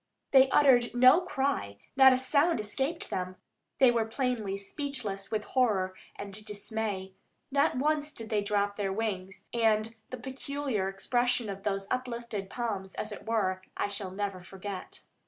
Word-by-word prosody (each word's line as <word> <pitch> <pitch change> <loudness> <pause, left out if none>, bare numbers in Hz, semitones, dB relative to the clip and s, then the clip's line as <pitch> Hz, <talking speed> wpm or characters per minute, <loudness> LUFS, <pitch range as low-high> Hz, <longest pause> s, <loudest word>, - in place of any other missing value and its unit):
They 265 -1 +7
uttered 245 -4 +5
no 255 +7 +7
cry, 270 - -1 0.2
not 265 -1 +9
a 255 - +4
sound 285 +3 +3
escaped 265 +10 -2
them; 185 0 -3 0.4
they 260 -2 +6
were 230 -2 +1
plainly 225 -5 -1
speechless 205 -3 -4
with 215 -1 -1
horror 210 -7 +1 0.2
and 200 +1 -7
dismay. 205 -2 -4 0.4
Not 280 -2 +2
once 300 +2 +1
did 225 -5 -7
they 210 -1 +2
drop 205 0 0
their 200 -2 -1
wings, 195 -2 -3
and 225 -1 +2 0.2
the 255 - -5
peculiar 265 -5 -3
expression 240 +4 0
of 195 0 -7
those 195 -1 -1
uplifted 235 -5 -3
palms, 200 -6 -3
as 215 - -3
it 210 - -9
were, 190 -5 +1 0.2
I - - 0
shall 200 -1 -4
never 195 -1 -3
forget. 190 +1 -8
220 Hz, 155 wpm, -30 LUFS, 195-255 Hz, 0.4 s, not